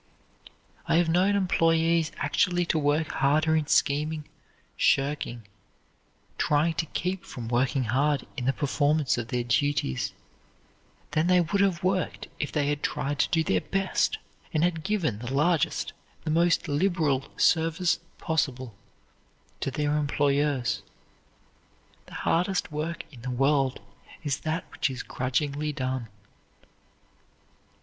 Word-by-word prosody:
I - - +3
have 170 0 +3
known 185 +4 +3
employees 165 -3 +2
actually 175 -3 +1
to 160 - +1
work 145 +2 +1
harder 155 +3 +2
in 155 -2 0
scheming, 150 +2 +1 0.5
shirking, 135 -5 +1 0.9
trying 150 +3 +2
to 160 - -9
keep 180 +4 -3
from 120 -3 -7
working 125 +3 +1
hard 135 +4 +1
in 125 -3 -4
the 135 - +4
performance 145 -1 +1
of 115 - -4
their 125 0 -1
duties, 120 - 0 1.0
than 155 +2 +1
they 180 0 +5
would 175 +4 +1
have 190 -4 +1
worked 185 -2 -1
if 150 - -2
they 150 -2 0
had 145 0 -1
tried 145 -1 -2
to - - +3
do 165 -3 +2
their 95 - +1
best, 195 -1 0 0.3
and 155 0 +1
had 170 -2 0
given 175 - 0
the 120 +2 -5
largest, 150 +4 +1 0.3
the 155 - -2
most 170 +2 +2
liberal 150 -3 +1
service 165 +2 +2 0.2
possible 130 -7 -1 0.9
to - - -1
their 145 +2 0
employers. 140 -6 +1 1.3
The - - -11
hardest 180 0 0
work 155 +2 -3
in 120 - -12
the 125 - -5
world 135 -1 +1 0.4
is 145 -3 -1
that 160 +2 -2
which - - 0
is 130 -2 -5
grudgingly 140 +4 -1
done. 130 -4 -3
150 Hz, 130 wpm, -27 LUFS, 135-165 Hz, 1.3 s, they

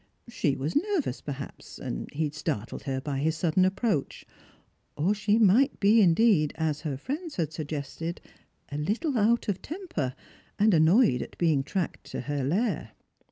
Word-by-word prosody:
She 150 -11 0
was 145 +5 -3
nervous, 340 - 0
perhaps, 140 -1 -7
and - - -5
he 155 +3 -1
had 150 -1 -2
startled 150 -8 -4
her 135 -2 -1
by 135 0 -3
his 155 +2 0
sudden 180 +3 +3
ajjproach; 195 - -2 0.7
or 170 +8 +2
she 210 +1 +1
might 230 +6 +4
be 215 +3 +5
indeed, 175 -4 +4
as 155 -2 -1
her 145 -5 -3
friends 295 - -5
had 160 -3 -2
suggested, 155 +2 -4 0.5
a 145 - -3
httle 240 - -1
out 230 +2 +2
of 200 -3 -1
temper, 305 - -4 0.4
and 210 0 +4
annoyed 160 - +5
at - - -8
being 160 -5 +2
tracked 180 +4 -3
to - - -4
her 145 -2 -2
lair. 165 - -1
165 Hz, 160 wpm, -28 LUFS, 145-215 Hz, 0.7 s, be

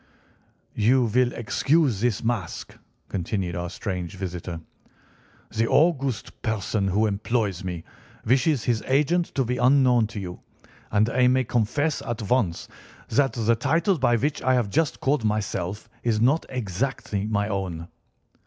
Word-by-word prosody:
"You 125 +4 +3
will 120 +2 +2
excuse 135 0 +1
this 120 -3 0
mask," 115 -7 -3 0.3
continued 95 -1 -2
our 85 0 -3
strange 90 0 -4
visitor. 90 -2 -5 1.0
"The 115 +1 +2
august 140 - +1
person 105 -2 -1
who 100 +3 +2
employs 105 -2 -1
me 90 -3 -4 0.4
wishes 130 +2 +2
his 120 -3 0
agent 150 +6 +2
to 135 - +1
be 125 +2 -1
unknown 125 -3 +4
to 110 -1 -7
you, 90 -2 -6 0.5
and 105 +1 +3
I 125 +1 +3
may 130 +1 +3
confess 125 +6 0
at 115 -2 -4
once 105 -10 +1 0.4
that 135 -1 +2
the 115 0 +2
title 160 - +1
by 120 -2 +3
which 145 +5 -1
I 130 0 +3
have 115 -5 0
just 160 +2 0
called 140 -2 +1
myself 105 -2 -2
is 115 -3 +1
not 135 +8 +2
exactly 105 -2 -2
my 100 -1 0
own." 95 -5 -3
115 Hz, 145 wpm, -25 LUFS, 100-130 Hz, 1.0 s, unknown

